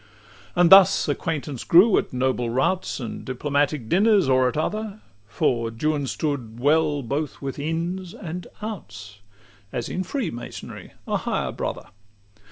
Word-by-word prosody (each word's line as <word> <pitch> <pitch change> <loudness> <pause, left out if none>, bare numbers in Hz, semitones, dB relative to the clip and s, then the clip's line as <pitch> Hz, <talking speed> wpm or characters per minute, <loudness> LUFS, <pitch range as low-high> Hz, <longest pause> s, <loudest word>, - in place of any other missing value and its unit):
XXIV 105 -2 -25
And 175 - +6
thus 195 0 +7
acquaintance 150 -6 -3
grew, 190 +6 +6
at - - -5
noble 125 -2 0
routs, 135 +11 0
And 120 -4 -6
diplomatic 140 0 -1
dinners, 200 - +4
or 130 -1 +4
at 125 - -2
other 215 +5 -2 0.3
For 115 +1 0
Juan 145 +5 -1
stood 125 -7 -3
well 150 +1 +2
both 140 +5 -3
with 135 0 -5
Ins 170 +4 -3
and 180 -2 -7 0.2
Outs, 110 - -8 0.5
As 120 -2 -3
in 185 - -2
freemasonry 180 - -6
a - - +1
higher - - -2
brother. - - -5
145 Hz, 140 wpm, -24 LUFS, 120-175 Hz, 0.5 s, thus